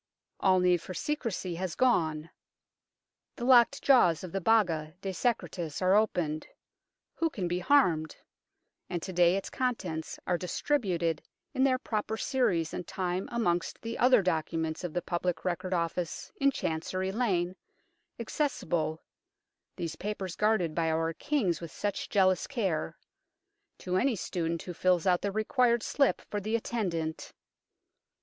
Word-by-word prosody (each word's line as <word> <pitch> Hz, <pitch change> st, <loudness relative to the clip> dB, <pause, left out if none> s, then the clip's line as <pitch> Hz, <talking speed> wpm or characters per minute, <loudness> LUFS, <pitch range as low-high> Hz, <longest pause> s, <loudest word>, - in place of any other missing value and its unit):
All 185 Hz, -1 st, +4 dB
need 180 Hz, -2 st, +3 dB
for 185 Hz, -, -8 dB
secrecy 230 Hz, -, -2 dB
has 185 Hz, -2 st, -3 dB
gone; 165 Hz, -11 st, +1 dB, 1.0 s
the 240 Hz, -, -4 dB
locked 255 Hz, +2 st, +5 dB
jaws 215 Hz, -, +5 dB
of 180 Hz, -, -6 dB
the 195 Hz, -, -2 dB
Baga 170 Hz, -7 st, +2 dB
de 195 Hz, -, -3 dB
Secretis 180 Hz, -, -2 dB
are 185 Hz, 0 st, +3 dB
opened 175 Hz, -7 st, +1 dB, 0.7 s
who 330 Hz, 0 st, 0 dB
can 190 Hz, -, -3 dB
be 175 Hz, +1 st, -1 dB
harmed? 180 Hz, -, +3 dB, 0.7 s
and 175 Hz, -2 st, -3 dB
to 190 Hz, -, -5 dB
day 175 Hz, 0 st, +4 dB
its 195 Hz, -, -5 dB
contents 190 Hz, -11 st, -2 dB
are 175 Hz, -1 st, 0 dB
distributed 180 Hz, -, 0 dB, 0.3 s
in 265 Hz, -1 st, +2 dB
their 260 Hz, -1 st, +4 dB
proper 220 Hz, -3 st, -3 dB
series 185 Hz, -12 st, 0 dB
and 180 Hz, -, -5 dB
time 185 Hz, 0 st, -2 dB
amongst 180 Hz, -6 st, 0 dB
the 230 Hz, 0 st, -4 dB
other 250 Hz, -4 st, +5 dB
documents 160 Hz, -1 st, -1 dB
of 175 Hz, -3 st, -4 dB
the 175 Hz, -, -1 dB
Public 175 Hz, -1 st, -2 dB
Record 180 Hz, +1 st, -2 dB
Office 170 Hz, -1 st, -2 dB
in 275 Hz, -, +4 dB
Chancery 185 Hz, -3 st, -2 dB
Lane, 190 Hz, -6 st, 0 dB, 0.6 s
accessible 175 Hz, -, -1 dB, 0.7 s
these 165 Hz, -2 st, -4 dB
papers 195 Hz, -4 st, -4 dB
guarded 210 Hz, -7 st, +2 dB
by 165 Hz, 0 st, +1 dB
our 165 Hz, +1 st, 0 dB
Kings 200 Hz, -, 0 dB
with 165 Hz, -2 st, -7 dB
such 205 Hz, -1 st, -3 dB
jealous 185 Hz, -3 st, +3 dB
care 195 Hz, -, -2 dB, 0.8 s
to 185 Hz, 0 st, -2 dB
any 255 Hz, +4 st, +2 dB
student 170 Hz, -3 st, -3 dB
who 180 Hz, -, -6 dB
fills 180 Hz, 0 st, +2 dB
out 180 Hz, -2 st, +3 dB
the 200 Hz, -, -1 dB
required 235 Hz, +3 st, +2 dB
slip 280 Hz, -2 st, +2 dB
for 205 Hz, -, -3 dB
the 215 Hz, +3 st, -1 dB
attendant. 175 Hz, -9 st, -3 dB
185 Hz, 145 wpm, -30 LUFS, 170-225 Hz, 1.0 s, locked